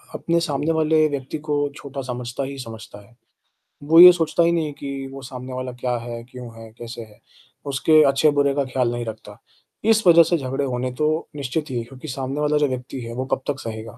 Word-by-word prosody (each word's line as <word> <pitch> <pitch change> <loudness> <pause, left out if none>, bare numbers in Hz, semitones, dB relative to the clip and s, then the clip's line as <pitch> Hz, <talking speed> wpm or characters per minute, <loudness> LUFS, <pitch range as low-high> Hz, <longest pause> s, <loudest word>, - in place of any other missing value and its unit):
अपने 170 0 0
सामने 150 +3 -1
वाले 155 0 +3
व्यक्ति 140 +1 -4
को 145 -1 +1 0.2
छोटा 140 -1 -7
समझता 120 +2 -4
ही 140 +1 -6
समझता 110 -3 -9
है। 120 - -24 0.7
वो 165 +1 +8
ये 180 0 +12
सोचता 170 0 +1
ही 170 0 +3
नहीं 165 -2 0
है 150 - -5
कि 140 -1 -5
वो 135 0 -9
सामने 130 0 -8
वाला 130 0 -4
क्या 125 -1 -1
है, 115 0 -7
क्यों 125 -1 -10
है, 110 -1 -11
कैसे 120 0 -7
है 105 -1 -16 0.5
उसके 155 +3 +4
अच्छे 145 +3 +3
बुरे 140 -1 +1
का 140 - 0
ख़्याल 125 -2 -1
नहीं 120 0 -3
रखता। 110 -1 -9 0.5
इस 220 -3 +3
वजह 170 -1 +8
से 170 +2 +1
झगड़े 135 +1 -2
होने 125 -1 -2
तो 155 +1 0
निश्चित 145 +2 -3
ही 125 - -2
है 115 - -3
क्योंकि 135 +5 -11
सामने 135 +2 -4
वाला 150 0 +1
जो 145 - +3
व्यक्ति 130 0 -5
है 115 0 -7
वो 130 +2 -3
कब 130 - -10
तक 140 -2 -1
सहेगा? 110 0 -7
135 Hz, 225 wpm, -22 LUFS, 125-150 Hz, 0.7 s, ये